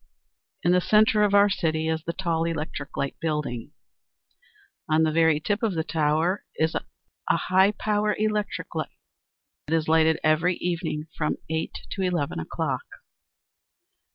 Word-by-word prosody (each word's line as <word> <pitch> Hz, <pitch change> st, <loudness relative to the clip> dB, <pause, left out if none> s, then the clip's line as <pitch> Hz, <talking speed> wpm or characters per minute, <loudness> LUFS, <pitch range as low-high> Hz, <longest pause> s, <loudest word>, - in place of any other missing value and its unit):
In 175 Hz, -, +3 dB
the 180 Hz, 0 st, +4 dB
center 215 Hz, +2 st, +4 dB
of 205 Hz, -1 st, +3 dB
our 200 Hz, 0 st, +7 dB
city 160 Hz, -5 st, 0 dB
is 160 Hz, 0 st, 0 dB
the 170 Hz, -, -2 dB
tall 170 Hz, -3 st, -1 dB
Electric 155 Hz, -3 st, -4 dB
Light 140 Hz, -, -2 dB
Building. 150 Hz, -7 st, -3 dB, 1.2 s
On 155 Hz, +1 st, +4 dB
the 160 Hz, -, +2 dB
very 160 Hz, -1 st, +3 dB
tip 205 Hz, +6 st, -1 dB
of 220 Hz, -6 st, 0 dB
the 160 Hz, -, 0 dB
tower 160 Hz, +4 st, +1 dB
is 160 Hz, +1 st, +1 dB
a -, -, -3 dB, 0.5 s
high 190 Hz, +2 st, +3 dB
power 210 Hz, 0 st, 0 dB
electric 210 Hz, -1 st, -2 dB
light. -, -, -4 dB, 0.7 s
It 160 Hz, -, +1 dB
is 160 Hz, -1 st, 0 dB
lighted 160 Hz, 0 st, +4 dB
every 160 Hz, +4 st, +3 dB
evening 170 Hz, -4 st, -3 dB
from 150 Hz, -, -1 dB
eight 160 Hz, 0 st, -2 dB
to 195 Hz, -, -3 dB
eleven 175 Hz, -6 st, -1 dB
o'clock. -, -, -2 dB
165 Hz, 150 wpm, -25 LUFS, 155-190 Hz, 1.2 s, our